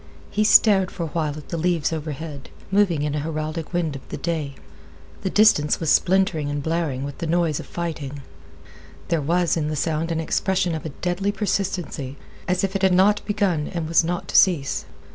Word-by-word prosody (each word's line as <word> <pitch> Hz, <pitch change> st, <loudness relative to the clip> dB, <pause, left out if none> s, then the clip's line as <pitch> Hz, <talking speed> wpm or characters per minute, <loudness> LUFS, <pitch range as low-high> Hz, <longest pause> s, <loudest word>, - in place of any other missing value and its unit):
He 215 Hz, -, +1 dB
stared 200 Hz, -3 st, +5 dB
for 170 Hz, -, -5 dB
a -, -, -2 dB
while 155 Hz, -2 st, -2 dB
at 150 Hz, -, -11 dB
the 170 Hz, -, -3 dB
leaves 170 Hz, -2 st, +1 dB
overhead, 150 Hz, -2 st, -6 dB, 0.2 s
moving 190 Hz, -7 st, +2 dB
in 150 Hz, -1 st, -1 dB
a 150 Hz, -, -1 dB
heraldic 155 Hz, +1 st, -4 dB
wind 170 Hz, -4 st, -1 dB
of 135 Hz, -, -7 dB
the -, -, -5 dB
day. 155 Hz, -5 st, -3 dB, 0.7 s
The 190 Hz, -, -1 dB
distance 185 Hz, -8 st, +4 dB
was 160 Hz, -3 st, +1 dB
splintering 180 Hz, -5 st, +2 dB
and 145 Hz, -1 st, -3 dB
blaring 160 Hz, -5 st, -1 dB
with 140 Hz, 0 st, -6 dB
the 165 Hz, -, -3 dB
noise 165 Hz, -2 st, +1 dB
of -, -, -8 dB
fighting. 145 Hz, -5 st, -5 dB, 0.9 s
There 165 Hz, -2 st, +1 dB
was 170 Hz, +4 st, +1 dB
in 155 Hz, -2 st, -1 dB
the 155 Hz, -, -2 dB
sound 160 Hz, +2 st, -1 dB
an 165 Hz, -, -1 dB
expression 185 Hz, +2 st, 0 dB
of 160 Hz, 0 st, -4 dB
a 140 Hz, -, -9 dB
deadly 185 Hz, +3 st, 0 dB
persistency, 185 Hz, -9 st, -2 dB, 0.3 s
as 180 Hz, 0 st, +1 dB
if 195 Hz, 0 st, -1 dB
it 195 Hz, -, 0 dB
had 190 Hz, -1 st, +4 dB
not 205 Hz, +3 st, +4 dB
began 195 Hz, -8 st, 0 dB
and 170 Hz, -3 st, -4 dB
was 165 Hz, +1 st, +4 dB
not 175 Hz, +1 st, -3 dB
to -, -, -5 dB
cease. 155 Hz, -8 st, +3 dB
165 Hz, 200 wpm, -23 LUFS, 150-185 Hz, 0.9 s, stared